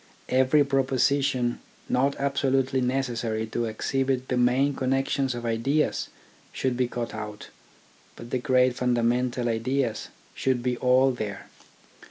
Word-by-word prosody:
Every 130 +3 +4
proposition 135 -2 +1 0.3
not 135 +2 +1
absolutely 135 -1 0
necessary 120 -4 -1
to 115 +1 -2
exhibit 130 +3 -1
the 125 - +1
main 125 +3 +2
connection 135 +1 0
of 120 - -6
ideas 115 +7 0 0.4
should 130 -2 -1
be 125 0 +1
cut 120 -2 -4
out, 105 -1 -7 0.7
but 120 - -11
the 130 - 0
great 130 -1 +3
fundamental 125 0 0
ideas 115 0 -1 0.3
should 130 -2 0
be 125 -1 0
all 130 +2 +4
there. 110 -5 -5
125 Hz, 125 wpm, -26 LUFS, 120-135 Hz, 0.7 s, Every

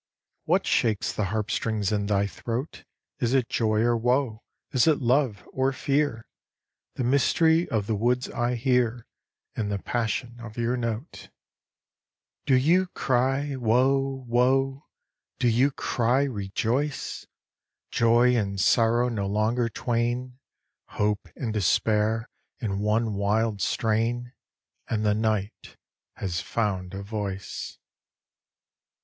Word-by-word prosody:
What - - +2
shakes 110 -4 +1
the 105 - -1
harp 105 +2 -2
strings 110 -3 -1
in 100 -1 0
thy 100 -1 +2
throat? 120 - -5 0.3
Is 120 +1 +1
it 130 -3 +1
joy 110 -2 +1
or 120 +1 +3
woe? 125 -1 0 0.3
Is 130 +1 +3
it 155 -3 +5
love 125 -4 +1
or 130 +1 +1
fear? 140 -3 0 0.7
The 130 - -2
mystery 160 +6 +3
of 110 -6 0
the 110 - -1
woods 120 +4 +1
I 120 +1 -1
hear 120 -1 +1 0.5
In 105 -2 -2
the 100 - -1
passion 120 +3 -3
of 115 -1 -10
your 120 +1 0
note. 115 +4 -5 1.2
Do 130 - +5
you 170 +8 +3
cry, 135 0 0
Woe! 135 +2 +1
Woe! 135 +3 +1 0.5
Do 125 - +1
you 120 +4 +4
cry, 125 -1 +1
Rejoice! 125 +4 -2 0.6
Joy 120 +2 +4
and 100 -4 -1
sorrow 115 +4 +3
no 105 -5 -2
longer 110 +4 +1
twain, 120 +2 -2 0.6
Hope 105 0 0
and 115 -5 -3
despair 105 +4 +1 0.3
in 100 -6 -2
one 105 +1 +1
wild 105 +1 0
strain, 115 +4 0 0.6
And 110 -1 0
the 105 - +3
night 110 -1 -2 0.4
has 85 -3 -3
found 95 -5 -2
a 100 - -5
voice. 100 -2 -5
115 Hz, 125 wpm, -26 LUFS, 105-130 Hz, 1.2 s, it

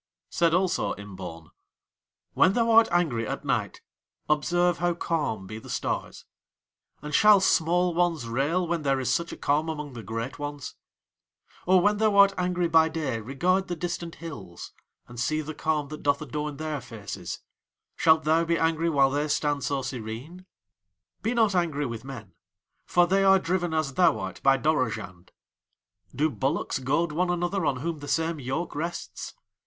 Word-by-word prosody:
Said 170 -1 +2
also 185 0 0
Imbaun: 95 -5 -9 0.8
"When 185 - +4
thou 230 0 +2
art 225 0 +7
angry 145 -11 +1
at - - -5
night - - -1 0.5
observe 175 +3 +2
how 175 0 +1
calm 145 - -2
be 110 +3 -7
the - - -13
stars; - - -3 0.8
and 150 0 -6
shall 210 +5 +7
small 175 -1 +2
ones 165 -7 0
rail 145 +10 0
when 170 -1 -1
there 135 -2 +1
is 130 - 0
such 170 0 -1
a - - -7
calm 150 +3 0
among 150 -3 -5
the 120 - -7
great 115 +6 -5
ones? 145 -2 -5 0.9
Or 185 0 +5
when 205 +2 +3
thou 215 -1 +2
art 200 0 +7
angry 180 -1 0
by 160 -1 +4
day 150 -8 -2
regard 180 - 0
the 175 - -3
distant 170 0 -4
hills, 110 - -9 0.4
and 120 -1 -10
see 155 +5 0
the 155 0 -5
calm 150 -2 -1
that 155 0 -8
doth 140 -1 +2
adorn 150 +1 -4
their 155 -2 -3
faces. 110 -5 -7 0.5
Shalt 160 -1 +4
thou 160 +2 +3
be 170 0 +1
angry 165 0 +1
while 135 -3 +3
they 145 +2 0
stand 145 -1 0
so 140 -2 -1
serene? 130 +9 -7 0.7
"Be 230 +3 -1
not 220 -4 +3
angry 160 -5 0
with 115 -2 -5
men, 115 -9 -9 0.5
for 175 0 +4
they 195 +2 +2
are 195 0 +6
driven 180 -2 -1
as 155 -3 -1
thou 170 0 +4
art 95 -1 -6
by 135 0 +4
Dorozhand. 115 - -2 0.9
Do 150 +4 +1
bullocks 135 +4 -1
goad 145 +6 0
one 175 +4 0
another 175 0 0
on 130 -2 -1
whom 165 0 -3
the 145 - -8
same 160 +2 0
yoke 135 +6 -3
rests? 170 +4 -5
155 Hz, 170 wpm, -26 LUFS, 135-175 Hz, 0.9 s, art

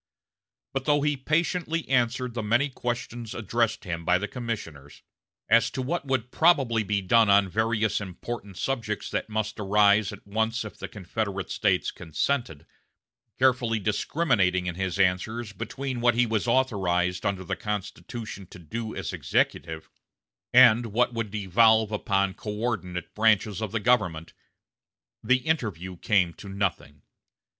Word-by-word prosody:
But 135 -1 -2
though 145 -1 +3
he 150 -1 +2
patiently 165 +3 -1
answered 125 -1 +1
the 115 - -3
many 120 +7 +2
questions 120 -2 -5
addressed 115 +1 -1
him 85 -2 -4
by 90 +2 +3
the 105 +3 -3
commissioners, 100 - -6 0.4
as - - +4
to 130 - -4
what 145 +1 -3
would 130 -2 -1
probably 135 -9 +3
be 100 -1 -1
done 110 +3 +4
on 100 0 +5
various 110 +2 0
important 100 +1 -7
subjects 115 -5 -3
that - - -2
must 110 0 -3
arise 105 0 +3
at - - -11
once 110 +3 -1
if 110 - -8
the - - -6
Confederate 100 0 -4
States 95 -4 +1
consented, 80 - -2 0.7
carefully 125 -3 +2
discriminating 105 - +1
in 90 - -2
his 95 +1 -3
answers 100 +4 0
between 125 +3 -5
what 120 -1 +3
he 120 +1 +4
was 110 0 -1
authorized 95 -8 +1
under 95 -2 -1
the 85 - -3
Constitution 105 0 -6
to - - -12
do 110 +7 -6
as - - -4
Executive, 80 -1 -1 0.6
and 120 -2 +7
what 120 +3 +1
would 115 -2 -3
devolve 110 +2 +3
upon 100 -2 0
coördinate 105 -5 -4
branches 105 -2 +2
of 110 -3 -3
the 115 - -1
government, 95 -9 +1 0.9
the 130 -1 +2
interview 100 - -2
came 90 -1 +1
to 100 - -11
nothing. 95 -7 -3
110 Hz, 145 wpm, -26 LUFS, 95-120 Hz, 0.9 s, and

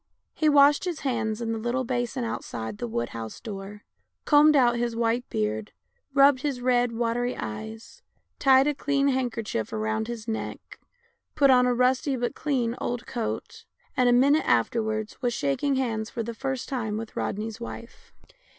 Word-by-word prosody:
He 310 - +2
washed 290 +2 +5
his 350 -4 -3
hands 230 -4 -1
in 230 -1 -2
the 225 - -2
little 240 +3 -1
basin 245 0 -2
outside 110 - -5
the 120 - -3
wood 120 +1 -2
house 110 -1 -7
door, 205 -1 -8 0.4
combed 300 0 +6
out 240 -3 +4
his 235 -1 -1
white 235 +1 0
beard, 105 0 -2 0.4
rubbed 275 -1 +6
his 280 -3 -2
red, 245 -1 +2
watery 235 +1 -1
eyes, 220 - -7 0.4
tied 265 -1 +6
a 295 - +2
clean 280 0 +1
handkerchief 235 - -2
round 110 - -1
his 235 -2 -6
neck, 220 -1 -5 0.6
put 275 -2 +5
on 250 -1 +5
a 245 - +2
rusty 260 +3 +2
but 245 -1 -2
clean 245 -5 -1
old 245 0 -3
coat, 235 -3 -4 0.3
and 250 -1 +3
a - - +5
minute 280 +5 +4
afterwards 215 - 0
was 240 -2 0
shaking 145 - 0
hands 225 -4 -1
for 230 - -4
the 235 +1 -5
first 265 +1 -3
time 220 -6 -2
with 225 0 -7
Rodney's 220 +2 -3
wife. 235 0 -9
240 Hz, 170 wpm, -26 LUFS, 220-260 Hz, 0.6 s, combed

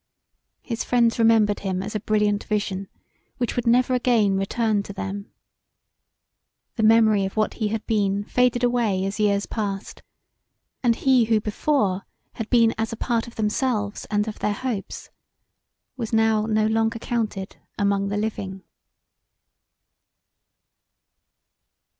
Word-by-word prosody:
His 230 -2 -3
friends 235 -1 +2
remembered 225 -2 +4
him 190 -1 -2
as 210 - -6
a 215 - -1
brilliant 210 -1 +1
vision 200 -2 -2 0.5
which 245 -2 -2
would 245 -1 -2
never 250 +2 +3
again 235 -6 +2
return 210 +2 0
to 200 - -9
them. 200 +1 -6 1.4
The - - -2
memory 220 -2 +5
of 195 +2 -4
what 215 - +1
he 220 - -2
had 220 +1 -3
been 205 -2 0
faded 245 +2 +1
away 230 -6 +1
as 195 +2 -4
years 205 -1 +2
passed; 200 -3 -4 0.8
and 235 -2 +3
he 260 -2 +3
who 220 -1 +2
before 210 -3 0 0.3
had 225 -2 -6
been 230 -2 +4
as 225 +1 -1
a - - -4
part 235 -1 -1
of 235 - -12
themselves 215 -1 -1
and 210 0 -1
of 215 - -6
their 210 - 0
hopes 235 -4 -5 0.9
was 230 -4 -4
now 220 -1 +2
no 215 -1 +2
longer 225 +1 +1
counted 215 -5 -3 0.2
among 200 -1 +1
the 205 +1 -2
living. 195 -3 -4
215 Hz, 135 wpm, -23 LUFS, 205-230 Hz, 1.4 s, memory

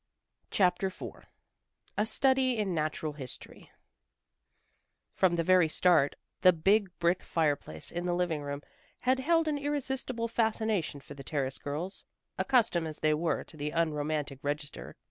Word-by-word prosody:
CHAPTER 185 0 +2
IV 190 - -9 0.7
A 210 +1 +1
STUDY 260 +1 +3
IN 205 -4 0
NATURAL 155 -1 -1
HISTORY 135 -4 -7 1.4
From 185 -2 +3
the 165 - +1
very 180 -2 +5
start 160 -4 +4 0.3
the 185 - +8
big 195 +4 +3
brick 170 +2 +2
fireplace 145 - -1
in 175 +1 -3
the 175 -1 +1
living 175 -4 0
room 140 0 -5 0.4
had 255 +1 +2
held 330 +4 +2
an 295 -2 0
irresistible 265 -4 -2
fascination 220 -9 0
for 145 - -11
the 140 -1 -10
Terrace 135 -2 -2
girls, 155 +7 -4 0.4
accustomed 225 -11 +3
as 155 - -6
they 155 0 +2
were 160 +2 0
to - - -15
the 150 0 -3
unromantic 150 -3 -1
register. 145 0 -4
175 Hz, 145 wpm, -30 LUFS, 150-220 Hz, 1.4 s, the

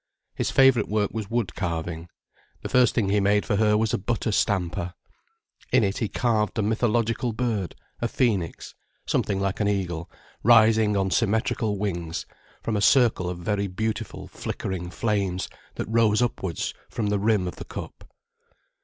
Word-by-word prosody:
His - - -1
favourite 135 -5 +4
work 105 -1 +1
was 110 -2 -4
wood 115 -8 -1
carving. 85 -2 -4 0.5
The - - -4
first 125 -2 +4
thing 105 -5 +1
he 105 +1 +3
made 100 +1 +2
for 100 - 0
her 105 0 +3
was 110 0 0
a - - +1
butter 115 +2 -1
stamper. 90 -4 0 0.8
In - - +4
it 95 +1 0
he 110 - -1
carved 110 -3 0
a 110 - +1
mythological 115 +2 +1
bird, 110 -6 -2 0.3
a 120 - +1
phoenix, 110 -9 -1 0.3
something 95 - 0
like 100 0 -1
an 105 - +1
eagle, 90 -5 -2 0.3
rising 110 -2 +5
on 95 -1 0
symmetrical 110 -1 +1
wings, 85 -5 -3 0.4
from 110 - -1
a 105 - 0
circle 115 -6 +4
of 90 - -4
very 100 +2 -1
beautiful 110 +3 -4
flickering 90 -2 -5
flames 100 -3 -1 0.3
that - - -3
rose 110 -1 +3
upwards 95 -8 -2 0.2
from 105 -3 -2
the 105 -1 +1
rim 105 -3 +2
of 90 - -6
the - - -7
cup. - - -9
105 Hz, 160 wpm, -25 LUFS, 95-110 Hz, 0.8 s, rising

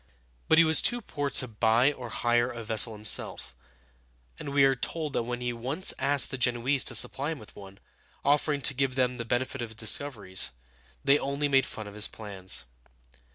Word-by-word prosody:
But 160 - +3
he 165 - +7
was 160 -1 +5
too 245 - +2
poor 145 -10 -5
to 130 - -1
buy 115 +4 +1
or 125 -3 -10
hire 120 +1 0
a 115 -2 -8
vessel 110 +1 +3
himself, 105 -10 +1 0.9
and - - -7
we 140 0 +2
are 135 0 +3
told 150 +3 -4
that - - -1
when 120 0 -5
he 125 0 -3
once 130 +10 -1
asked 140 0 +3
the 135 - -6
Genoese 125 +2 +2
to - - +1
supply 140 +3 +3
him 160 - -5
with 110 - -15
one, 100 -1 -14 0.5
offering 145 0 +1
to 140 - +3
give 135 -1 -2
them 125 -1 -1
the 115 - -6
benefit 120 +2 -3
of 120 - -5
his 110 - -12
discoveries, 105 - +1 0.5
they 140 +1 +3
only 140 +1 -3
made 135 -1 +2
fun 110 - -8
of 105 - -11
his 105 +1 +2
plans. 95 - -3
125 Hz, 200 wpm, -27 LUFS, 110-140 Hz, 0.9 s, he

